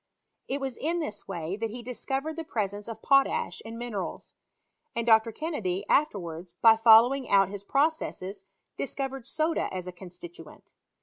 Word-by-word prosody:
It 275 - -2
was 265 -3 -4
in 335 +4 -1
this 215 -11 -5
way 170 +2 -4
that 225 +1 -2
he 240 +2 -7
discovered 270 +5 -3
the 330 - -4
presence 205 - -3
of 225 -1 -8
potash 275 -9 +2
in 225 +1 -8
mineriils; 235 -5 -5 0.6
and 230 0 -1
Dr. 225 0 +5
Ken 315 +9 -4
nedy 185 -8 -2
afterwards, 175 - 0
by 225 -1 +8
following 230 +4 +6
out 195 -1 +5
his 200 0 -7
processes, 210 - -1 0.3
dis 275 - -3
covered 270 -2 -4
soda 320 +1 0
OS 185 -1 -4
a 180 - -5
constituent. 175 -3 -12
225 Hz, 165 wpm, -28 LUFS, 190-270 Hz, 0.6 s, by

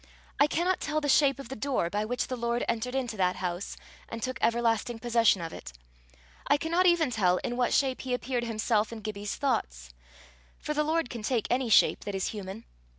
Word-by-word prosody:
I 290 - +6
cannot 355 +4 0
tell 310 0 -1
the 295 - -3
shape 275 -1 +4
of 275 -4 -9
the 265 - -5
door 260 -7 -1
by 210 +1 -1
which 245 +3 -1
the 255 - -4
Lord 235 0 -1
entered 250 +3 -2
into 245 -4 -2
that 185 -1 +2
house, 180 +1 -4 0.3
and 230 - -5
took 255 0 -3
everlasting 235 0 +1
possession 230 -5 +3
of 165 - -6
it. - - -9 0.7
I 285 - +4
cannot 335 +4 +2
even 340 -6 +3
tell 185 -6 +2
in 245 - -2
what 245 -1 +1
shape 265 -2 +1
he 255 -1 -1
appeared 245 -1 -2
himself 220 -1 0
in 225 -1 -7
Gibbie's 205 -1 -4
thoughts 60 - -2 0.6
for 300 - -4
the 300 0 +1
Lord 315 -3 0
can 235 - -6
take 225 0 0
any 250 -1 +1
shape 215 - +5
that 205 - -3
is 190 - -1
human. 205 +1 -7
235 Hz, 210 wpm, -28 LUFS, 215-270 Hz, 0.7 s, I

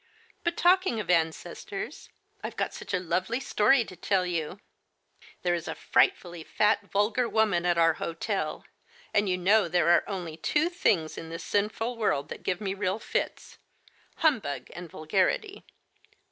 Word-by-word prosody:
But 340 0 -1
talking 365 - +3
of 190 -4 -1
ancestors, 175 - -2 0.3
I've - - -5
got - - -2
such - - -8
a 185 - +1
lovely 185 +7 -1
story 240 0 +3
to 185 - -11
tell 185 +1 +1
you. 175 +1 -3 0.8
There 175 -1 +2
is 170 0 -3
a - - -3
frightfully 175 - +1
fat, 210 +3 +1
vulgar 215 +4 +1
woman 200 -6 +2
at 175 -1 +2
our 165 -1 +5
hotel, 165 +1 -3 0.5
and 205 -1 +2
you 180 - +1
know 195 +2 +4
there 170 -1 +2
are 175 - +5
only 175 -5 -5
two 300 - +1
things 195 - +1
in 165 - -8
this 165 0 -6
sinful 220 +4 -1
world 150 -10 0
that - - -7
give 180 -1 -1
me 195 -2 -2
real 195 0 -1
fits - - -4 0.3
— - - -31
humbug 250 - +1
and 175 -1 -8
vulgarity. 190 - -1
190 Hz, 160 wpm, -28 LUFS, 170-225 Hz, 0.8 s, our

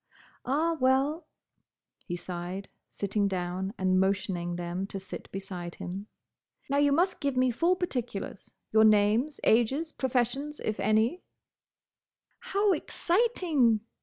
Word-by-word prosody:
"Ah, 310 +6 +1
well!" 270 +5 +2 0.8
he 175 - -2
sighed, 180 +2 -6 0.2
sitting 200 0 0
down 185 0 -2
and 185 0 +2
motioning 190 -2 0
them 175 +2 -3
to 195 - -5
sit 190 - -8
beside 185 -3 -6
him. 195 +4 -6 0.6
"Now 280 - 0
you 285 0 +4
must 355 +6 +2
give 280 -3 -1
me 255 0 +3
full 340 +9 +2
particulars: 245 - -4 0.2
your 220 0 +6
names, 215 +7 +4
ages, 265 +8 +2
professions, 265 +3 -1
if 215 - -2
any—" 220 +11 +2 1.2
"How 420 -4 +1
exciting!" 335 - +1
225 Hz, 120 wpm, -29 LUFS, 195-295 Hz, 1.2 s, your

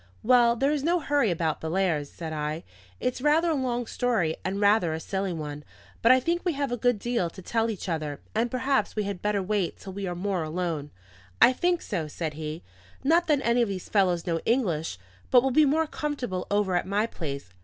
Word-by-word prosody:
"Well, 240 0 +5
there 275 +4 +1
is 295 -2 -1
no 345 +3 +2
hurry 285 -6 +1
about 165 -3 -1
Bellairs," 160 -3 0
said 160 -2 -6
I. 150 +2 -3 0.4
"It's 250 0 -2
rather 315 +4 +3
a - - +2
long 245 -4 -1
story 220 -11 0
and 195 +1 -2
rather 200 -5 +3
a 160 - -3
silly 190 +2 -2
one. 150 -3 -5 0.4
But 230 - +6
I 255 - +7
think 340 +6 -1
we 350 - +1
have 280 -2 -2
a - - +1
good 245 -1 +2
deal 235 -5 -1
to 190 - -13
tell 225 +4 0
each 205 -3 -5
other, 155 -4 -3
and 230 +2 +1
perhaps 255 -3 0
we 210 - 0
had 200 -3 -4
better 205 -2 0
wait 200 -2 -1
till 190 - -9
we 200 0 -4
are 175 - -3
more 185 0 -1
alone." 160 -2 -3 0.5
"I 255 - +7
think 350 +5 0
so," 170 -6 -3
said 155 +1 -4
he. 155 +2 -6 0.4
"Not 335 +5 +3
that 295 -3 +3
any 235 +1 +3
of 230 - +1
these 190 -2 -5
fellows 180 -5 +2
know 165 -2 0
English, 170 - 0 0.3
but 250 -1 +6
we'll 270 - +1
be 305 +4 +5
more 315 +3 +2
comfortable 270 -12 -3
over 205 -3 +1
at 175 - 0
my 205 +3 +1
place. 140 - -6
205 Hz, 220 wpm, -27 LUFS, 170-255 Hz, 0.5 s, I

